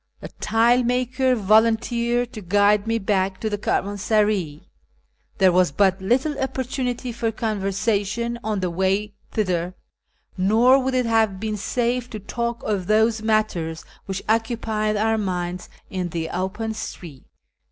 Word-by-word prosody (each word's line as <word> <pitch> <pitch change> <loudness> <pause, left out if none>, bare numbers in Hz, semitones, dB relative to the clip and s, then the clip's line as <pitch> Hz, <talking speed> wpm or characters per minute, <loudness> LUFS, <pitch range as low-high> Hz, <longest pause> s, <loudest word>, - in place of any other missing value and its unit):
The - - -8
tile 230 +3 +3
maker 255 +1 +1
volun 220 +1 +4
teered 240 +1 -1
to 215 - -7
guide 205 +3 +3
me 230 0 +1
back 195 -2 0
to 220 - -2
the 205 - -1
caravansaray. 205 -6 0 0.7
There 190 -1 +5
was 180 -3 +3
but 190 +5 +2
little 255 +10 +1
opi^ortunity 260 -2 -3
for 225 -1 -1
conversation 215 +1 -1
on 215 -3 -1
the 180 -1 -1
way 190 +4 0 0.2
thither, 180 -4 -1 0.6
nor 225 +8 +4
would 260 0 -1
it 250 -1 +2
have 220 -4 +2
been 215 0 -2
safe 245 +4 -1
to 215 - -6
talk 235 +3 -4
of 195 -4 -2
those 220 +1 +3
matters 215 -7 -1 0.2
which 195 0 -4
occu 225 +1 0
pied 215 -1 -1
our 220 +1 +1
minds 180 -2 -3 0.2
in 185 -2 -2
the 165 -1 -3
open 210 +5 -3
street. 170 -9 -8
215 Hz, 145 wpm, -23 LUFS, 190-235 Hz, 0.7 s, There